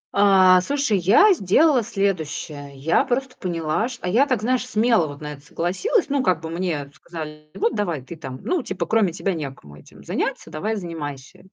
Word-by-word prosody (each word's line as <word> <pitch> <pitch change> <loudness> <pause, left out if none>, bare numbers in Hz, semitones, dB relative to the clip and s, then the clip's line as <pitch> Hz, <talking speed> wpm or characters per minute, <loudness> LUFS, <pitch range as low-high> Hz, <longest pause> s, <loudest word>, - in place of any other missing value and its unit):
А, 190 -2 +6
слушай, 275 -1 0
я 230 - +6
сделала 285 - +3
следующее. 160 -9 -3
Я 150 +5 +2
просто 255 +1 -2
поняла, 170 +3 -1
что 245 -6 -8
а - - -1
я 245 +9 +4
так, 255 -6 0
знаешь, 250 +2 0
смело 225 -7 +3
вот 145 0 -9
на 150 0 -5
это 140 - -13
согласилась. 190 - -1
Ну, 280 -1 +1
как 185 -10 +2
бы 160 0 -6
мне 165 -5 -3
сказали: 150 -1 -9
"Вот 230 - 0
давай 175 - -2
ты 170 - -9
там, 130 -5 -8
ну, 360 -2 0
типа 190 -7 -4
кроме 215 -1 +2
тебя 190 +3 -2
некому 135 - -7
этим 75 - -16
заняться, - - -3
давай 210 +8 -2
занимайся". 155 -8 -7
185 Hz, 185 wpm, -22 LUFS, 155-230 Hz, -, А